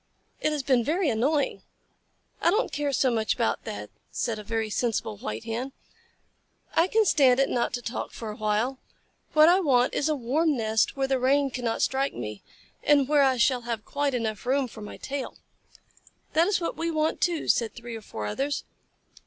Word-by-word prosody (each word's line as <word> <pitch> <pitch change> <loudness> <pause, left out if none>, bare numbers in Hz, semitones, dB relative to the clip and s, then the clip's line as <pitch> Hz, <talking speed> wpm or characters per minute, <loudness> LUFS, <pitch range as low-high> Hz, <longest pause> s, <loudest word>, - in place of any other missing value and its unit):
It 305 - +1
has 295 -2 -2
been 255 -3 +3
very 320 +4 +1
annoying." 275 +6 0 0.8
"I - - +4
don't 425 +7 +1
care 290 0 -1
so 260 -1 +2
much 220 -2 0
about - - -1
that," - - -6 0.2
said 225 -3 -2
a - - -7
very 225 0 -2
sensible 220 - -1
White 105 +2 -5
Hen. 245 +4 -4 1.0
"I 330 - +4
can 440 +3 +3
stand 270 -7 +4
it 275 - +3
not 235 -1 0
to 245 - -6
talk 235 - -4
for 225 -2 -6
a - - -8
while. 220 +4 0 0.5
What 310 0 +7
I 355 +3 +6
want 255 -8 +3
is 290 - 0
a 305 - +2
warm 290 +4 +1
nest 220 +2 +1
where 270 0 +1
the 265 -1 +1
rain 275 +2 +2
cannot 245 -3 -1
strike 270 +1 0
me, 105 -3 -6 0.4
and 285 -3 +4
where 295 0 +4
I 265 -2 +3
shall 250 +1 +3
have 230 -3 -4
quite 285 -1 -1
room 240 -2 -1
enough 215 -2 -3 0.3
for 220 - -10
my 210 - -8
tail." 275 -1 -5 1.0
"That 330 +2 +4
is 405 - +2
what 335 - -3
we 335 +1 -2
want, 315 -1 0
too," 345 -3 0
said 230 -2 +1
three 235 -1 -7
or 225 - -7
four 110 - -6
others. 275 - -2
260 Hz, 195 wpm, -26 LUFS, 225-295 Hz, 1.0 s, What